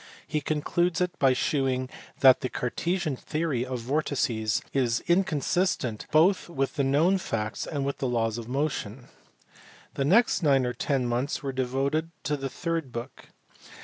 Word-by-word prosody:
He 150 - -2
concludes 165 +4 0
it 180 -1 -1
by 135 -2 +5
shewing 130 -1 0 0.3
that 130 -1 +7
the 130 - -2
Cartesian 160 +5 -2
theory 150 -2 -2
of 125 -1 -4
vortices 125 -5 0
was 120 -4 +1
incon 170 -5 +2
sistent 165 - 0
both 175 +4 +3
with 135 -5 -1
the 140 - +1
known 160 +8 +3
facts 105 - -3
and 140 -3 -2
with 140 - -3
the 135 - 0
laws 115 -1 0
of 115 - -8
motion. 135 -4 -3 0.8
The 135 - -1
next 220 - +4
nine 135 -5 +3
or 125 - -1
ten 135 -2 -1
months 120 +5 -1
were 135 - -2
devoted 135 +5 -1
to 150 - 0
the 135 -1 -4
third 165 -2 -3
book. 120 +2 -7
135 Hz, 160 wpm, -27 LUFS, 125-155 Hz, 0.8 s, that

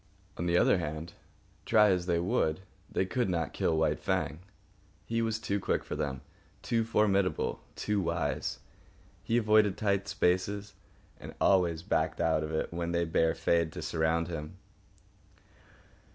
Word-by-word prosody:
On 85 - -3
the 85 0 +3
other 90 - +4
hand, 80 +1 -5 0.5
try 105 -3 +5
as 90 -1 0
they 85 -2 +2
would, 85 -1 0 0.3
they 95 - +1
could 120 +2 -1
not 85 -5 -1
kill 80 - +1
White 80 -1 +1
Fang. 75 - -1 0.7
He 115 0 -1
was 110 -1 0
too 100 -2 -2
quick - - -1
for - - -5
them, 70 -4 -3 0.4
too 115 -1 +1
formidable, 100 -6 +1
too 105 -1 -1
wise. 85 -6 -2 0.7
He 115 - +1
avoided 110 -3 +4
tight 100 -1 0
places 100 +3 +1 0.5
and - - -9
always 85 -4 +3
backed 80 -4 0
out 80 -1 +2
of 75 - -4
it 80 +1 -2
when 85 0 -2
they 85 0 +1
bade 80 0 +1
fair 85 -1 +2
to 80 - -8
surround 80 +1 0
him. 80 +1 -6
85 Hz, 150 wpm, -30 LUFS, 80-100 Hz, 0.7 s, try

